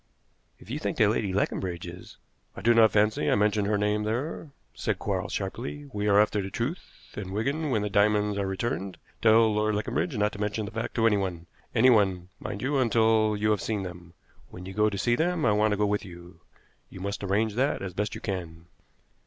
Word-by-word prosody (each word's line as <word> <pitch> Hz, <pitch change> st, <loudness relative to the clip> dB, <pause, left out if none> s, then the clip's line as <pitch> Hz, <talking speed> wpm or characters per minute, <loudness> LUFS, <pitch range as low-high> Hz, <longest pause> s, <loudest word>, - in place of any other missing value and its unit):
"If 110 Hz, -, -13 dB
you 145 Hz, -, -2 dB
think 165 Hz, -, -3 dB
that 105 Hz, -3 st, +4 dB
Lady 105 Hz, -3 st, -1 dB
Leconbridge 90 Hz, -2 st, -2 dB
is 90 Hz, +1 st, -10 dB, 0.2 s
" -, -, -33 dB
"I -, -, -6 dB
do 120 Hz, +2 st, +5 dB
not 115 Hz, -1 st, +6 dB
fancy 105 Hz, +1 st, +2 dB
I -, -, +4 dB
mention 105 Hz, 0 st, +2 dB
her 105 Hz, 0 st, +1 dB
name 105 Hz, +1 st, +1 dB
there," 125 Hz, +9 st, -3 dB, 0.2 s
said -, -, -2 dB
Quarles -, -, -3 dB
sharply. 135 Hz, +8 st, -5 dB
"We 105 Hz, 0 st, -1 dB
are 100 Hz, 0 st, +5 dB
after 105 Hz, 0 st, +2 dB
the 95 Hz, -, -5 dB
truth; 125 Hz, -, -6 dB
and, 100 Hz, -3 st, -6 dB
Wigan, 140 Hz, +10 st, -1 dB
when 110 Hz, -5 st, +1 dB
the -, -, -1 dB
diamonds 105 Hz, 0 st, +2 dB
are 100 Hz, -, -1 dB
returned, 95 Hz, -1 st, -3 dB, 0.2 s
tell 110 Hz, 0 st, +5 dB
Lord 105 Hz, 0 st, +1 dB
Leconbridge 115 Hz, +6 st, -2 dB
not 105 Hz, 0 st, +2 dB
to 100 Hz, -, -8 dB
mention 105 Hz, +1 st, -1 dB
the 105 Hz, -, -7 dB
fact 115 Hz, +1 st, -4 dB
to 115 Hz, -, +2 dB
anyone 95 Hz, -6 st, 0 dB, 0.3 s
anyone, 100 Hz, -7 st, +4 dB
mind, 100 Hz, -, -5 dB
until 115 Hz, -5 st, +2 dB
you 105 Hz, +1 st, +1 dB
have 105 Hz, -, +1 dB
seen 105 Hz, -3 st, -2 dB
them. 90 Hz, -2 st, -9 dB, 0.3 s
When 90 Hz, 0 st, -10 dB
you 95 Hz, -, -7 dB
go 105 Hz, +2 st, +3 dB
to 100 Hz, -, -5 dB
see 120 Hz, +4 st, +2 dB
them 170 Hz, +2 st, 0 dB
I -, -, +4 dB
want 105 Hz, +1 st, +3 dB
to 105 Hz, -, 0 dB
go 105 Hz, -, +2 dB
with 105 Hz, 0 st, 0 dB
you. 85 Hz, -1 st, -12 dB, 0.5 s
You -, -, -10 dB
must 100 Hz, +2 st, -4 dB
arrange 105 Hz, +3 st, +1 dB
that 130 Hz, -1 st, 0 dB
as 95 Hz, -2 st, -5 dB
best 105 Hz, +2 st, -2 dB
you -, -, -8 dB
can." 85 Hz, -4 st, -5 dB
105 Hz, 215 wpm, -27 LUFS, 100-115 Hz, 0.5 s, not